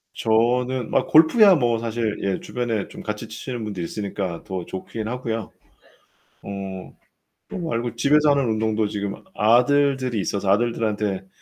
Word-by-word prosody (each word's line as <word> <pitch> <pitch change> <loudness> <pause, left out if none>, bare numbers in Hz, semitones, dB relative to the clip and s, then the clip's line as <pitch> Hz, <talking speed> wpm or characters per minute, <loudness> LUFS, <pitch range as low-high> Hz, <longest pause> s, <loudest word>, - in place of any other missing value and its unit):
저는 120 +2 +1
아, - - +3
골프야 185 +5 +6
뭐 120 -5 +1
사실 115 -2 -2
예 100 -1 -1
주변에 115 -5 -3
좀 - - -10
같이 105 +1 -5
치시는 120 +1 -6
분들이 100 -5 -4
있으니까 95 -3 -4
더 95 -2 -5
좋긴 110 +3 -6
하고요. 115 -2 -4 0.9
어. 95 -2 -7 0.6
그거 170 -3 -5
말고 120 -2 -2
집에서 150 +4 +4
하는 140 -2 +2
운동도 110 -1 0
지금 100 -1 -3 0.2
아들들이 130 0 +3
있어서 100 0 -2
아들들한테 105 -3 0
115 Hz, 310 characters per minute, -23 LUFS, 105-125 Hz, 0.9 s, 골프야